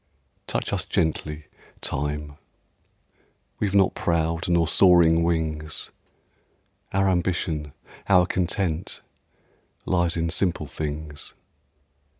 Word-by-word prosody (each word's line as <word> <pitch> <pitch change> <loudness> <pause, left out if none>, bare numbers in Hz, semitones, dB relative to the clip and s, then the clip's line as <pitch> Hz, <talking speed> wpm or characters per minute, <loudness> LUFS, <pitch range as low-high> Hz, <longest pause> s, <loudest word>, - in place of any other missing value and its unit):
Touch - - -2
us 95 -2 0
gently, 80 -4 -1 0.3
Time! 75 +1 -3 1.2
We've 100 -2 0
not 95 -2 +4
proud 85 0 0
nor 85 -2 +3
soaring 85 -2 +6
wings; 80 -2 -1 1.0
Our 95 0 +2
ambition, 85 -5 0 0.4
our 90 -2 +6
content, 90 -2 -1 0.8
Lies 85 -2 +1
in 85 0 0
simple 90 -1 0
things. 75 -1 -5
85 Hz, 90 wpm, -25 LUFS, 80-90 Hz, 1.2 s, soaring